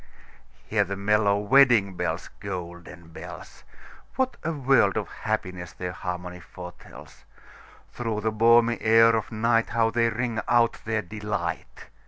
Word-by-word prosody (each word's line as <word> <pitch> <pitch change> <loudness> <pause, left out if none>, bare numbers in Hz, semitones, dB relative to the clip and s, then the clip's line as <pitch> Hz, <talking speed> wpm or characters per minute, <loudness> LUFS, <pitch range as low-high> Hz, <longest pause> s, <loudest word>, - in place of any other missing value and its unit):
Hear - - +1
the 100 - -5
mellow 100 0 +2
wedding 115 -2 +4
bells, 85 -1 -3
Golden 85 -3 -8
bells! 80 - -11 0.5
What 260 -1 0
a 165 - -1
world 135 - +2
of - - -2
happiness 90 -2 -4
their 90 -1 -5
harmony 90 0 -6
foretells! 90 0 -12 0.7
Through 115 -3 -3
the 110 +1 0
balmy 115 +1 +4
air 115 +1 +5
of 110 - -2
nightHow 115 0 +1
they 115 -1 +2
ring 115 0 -2
out 120 -1 +2
their 110 -1 -1
delight! 105 +2 -5
110 Hz, 130 wpm, -25 LUFS, 90-115 Hz, 0.7 s, air